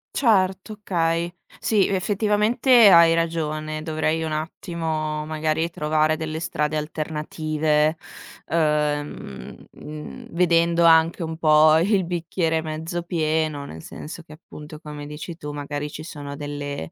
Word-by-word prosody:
Certo, 195 -3 +2
okay. 170 -4 -1 0.3
Sì, 210 -3 +2
effettivamente 210 +4 +4
hai 170 -2 +7
ragione, 155 -2 -2
dovrei 160 0 -1
un 160 - -3
attimo, 155 -1 -3
magari 155 +1 -1
trovare 155 -1 +1
delle 155 0 -4
strade 150 -2 -2
alternative, 155 0 -1 0.5
ehm, 150 - -1
mh, 150 0 -9
vedendo 170 -1 +3
anche 165 +1 +5
un 160 0 -5
po' 155 -1 +5
il 190 +2 +2
bicchiere 165 -1 -1
mezzo 160 +2 -4
pieno, 155 -3 -1
nel 80 - -10
senso 160 +2 -9
che 155 - -14
appunto, 150 -1 -11
come 150 -2 -8
dici 150 +3 -7
tu, 150 -2 -6
magari 145 0 -4
ci 155 - -8
sono 145 -3 -7
delle, 145 - -5
160 Hz, 125 wpm, -23 LUFS, 150-170 Hz, 0.5 s, hai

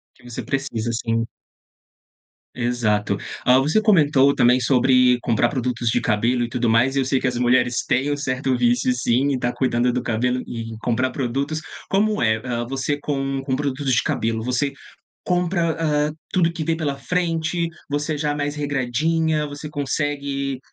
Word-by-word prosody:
Que - - -23
você 120 +1 -6
precisa, 120 -4 -2
sim. 115 0 -1 1.3
Exato. 120 -4 0 0.3
Hã, 125 +1 +6
você 155 +11 +2
comentou 145 -9 +4
também 125 +1 +4
sobre 125 0 +4
comprar 120 0 +2
produtos 125 -3 -1
de 120 - +2
cabelo 120 +3 +1
e - - -1
tudo 120 -1 0
mais 120 +4 +3
e 135 - +2
eu 130 - +1
sei 135 0 +1
que - - -4
as 125 - -1
mulheres 125 -1 +2
têm 135 +4 0
um 145 - -1
certo 130 -1 -1
vício 125 +1 +2
sim, 125 +3 +1
em 130 - -1
tá 120 0 0
cuidando 125 -1 +1
do 125 +1 -1
cabelo 125 +2 0
e - - -6 0.2
e - - -8
comprar 125 +2 0
produtos. 140 +5 -2 0.3
Como 210 +2 +1
é, 110 -1 +3
hã, 120 -2 -2
você 135 +2 -2
com 135 -2 -2
com 130 -1 -1
produtos 140 -1 -2
de 115 - +3
cabelo, 115 0 -1
você 125 +3 0 0.5
compra, 175 -2 +1
hã, 150 -1 +1 0.2
tudo 170 -2 +2
que 165 -2 -3
vê 165 +1 0
pela 150 -4 -2
frente, 170 +1 -1 0.2
você 150 +2 -1
já 150 0 0
é - - -2
mais 145 0 -2
regradinha, 150 +3 0
você 145 +1 -7
consegue, 140 -2 -2
135 Hz, 175 wpm, -22 LUFS, 120-145 Hz, 1.3 s, Hã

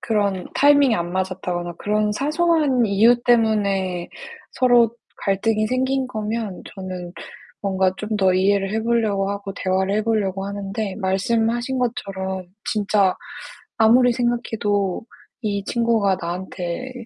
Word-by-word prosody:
그런 200 -4 -1
타이밍이 285 -3 +5
안 175 0 -3
맞았다거나 180 -2 -3
그런 210 0 0
사소한 300 -2 +2
이유 225 +4 +4
때문에 200 -6 +1 0.4
서로 240 -2 +3 0.2
갈등이 215 +2 0
생긴 260 +2 0
거면 215 -4 -4
저는 185 -2 -7 0.5
뭔가 190 -1 +1
좀 215 0 -3
더 190 -2 +4
이해를 195 +1 +2
해 220 0 -1
보려고 215 -4 +1
하고 200 -1 -5
대화를 190 +1 0
해 215 - +1
보려고 200 -4 -1
하는데 200 0 -4
말씀하신 230 +6 0
것처럼 190 -6 -3 0.2
진짜 205 -3 +2 0.6
아무리 240 +3 +5
생각해도 225 -5 -1 0.4
이 200 -2 -2
친구가 225 -4 +1
나한테 180 +6 -5
210 Hz, 280 characters per minute, -22 LUFS, 190-235 Hz, 0.6 s, 타이밍이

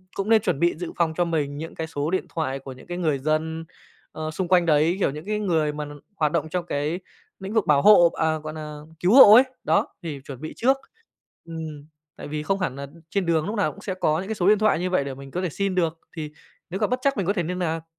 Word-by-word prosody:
cũng 200 +2 -2
nên 225 -1 +6
chuẩn 185 -9 -1
bị 170 0 +2
dự 175 0 -5
phòng 165 -2 +1
cho 175 - +2
mình 150 -4 -2
những 160 +2 -7
cái 160 0 -4
số 155 +1 -3
điện 185 - 0
thoại 135 -4 -2
của 135 0 -9
những 130 - -13
cái 175 0 -4
người 155 -6 0
dân, 160 +3 -1 0.5
ờ, 155 0 -5
xung 180 +3 -3
quanh 180 -1 +4
đấy, 160 +2 +3
kiểu, 160 - +2
những 150 +3 -8
cái 210 +1 -1
người 160 -7 +1
mà 150 0 -4
n 145 0 -10 0.2
hoạt 155 -5 +1
động 160 -1 -1
trong 180 +1 -2
cái 150 +3 -2 0.4
lĩnh 195 +2 -6
vực 220 -3 +2
bảo 145 -2 +4
hộ 175 -4 +7
à, 160 -1 0
gọi 155 0 -7
nà, 155 -1 -7 0.2
cứu 180 +4 +3
hộ 240 -5 +10
ấy. 245 - +9 0.2
Đó, 160 - +2 0.2
thì 155 -4 -5
chuẩn 135 -2 -9
bị 155 - -6
trước. 265 +3 +3 0.7
Ừm, 160 -3 -7 0.3
tại - - -8
vì 150 0 -4
không 195 +5 0
hẳn 180 -8 -2
là 140 0 -6 0.2
trên 200 -2 -1
đường 160 -2 +1
lúc 210 - -3
nào 205 - +1
cũng 200 - -14
sẽ 195 - -3
có 165 -4 +1
những 190 - -5
cái 220 - -3
số 180 -1 0
điện 210 0 +5
thoại 215 -6 +3
như 180 +1 -1
vậy 180 -6 +1
để 135 -1 -5
mình 135 0 -11
có 180 - -2
thể 180 - -1
xin 195 +4 -2
được, 165 -2 0 0.2
thì 155 -2 -5 0.4
nếu 190 +3 -4
gặp 210 - +2
bất 250 +1 0
trắc 275 0 +1
mình 195 - 0
có 200 - +1
thể 175 - -1
niên 180 +3 -3
nạc. 165 -2 -2
165 Hz, 275 wpm, -24 LUFS, 150-190 Hz, 0.7 s, hộ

